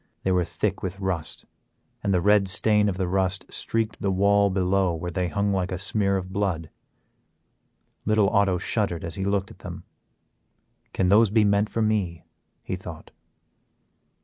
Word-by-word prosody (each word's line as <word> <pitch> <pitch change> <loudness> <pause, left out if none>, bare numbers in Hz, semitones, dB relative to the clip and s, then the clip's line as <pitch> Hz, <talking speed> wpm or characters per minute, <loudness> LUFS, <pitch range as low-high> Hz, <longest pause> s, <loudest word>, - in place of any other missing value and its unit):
They 95 - +1
were 90 -1 +3
thick 85 - -2
with 95 +1 -5
rust, 95 -5 -4 0.6
and 100 - 0
the 90 -2 +2
red 105 -1 +4
stain 105 +2 +3
of 90 - -3
the 95 -2 -1
rust 95 +1 0
streaked 110 -1 -2
the 100 - 0
wall 100 +1 +3
below 95 -1 +1
where 90 +2 -5
they 90 +1 -1
hung 100 +2 0
like 95 -1 -1
a 90 - -2
smear 100 +1 0
of 95 0 -6
blood. 90 -6 -2 1.3
Little 110 -1 +3
Otto 100 -3 +2
shuddered 95 -2 -1
as 85 - -5
he 95 +2 -3
looked 100 -1 -1
at - - -15
them; - - -8 1.1
can 95 -1 0
those 105 +2 +5
be 110 +1 +3
meant 100 +1 +2
for 115 - -1
me, 100 -6 -1 0.4
he - - -3
thought. - - -10
95 Hz, 170 wpm, -25 LUFS, 90-100 Hz, 1.3 s, those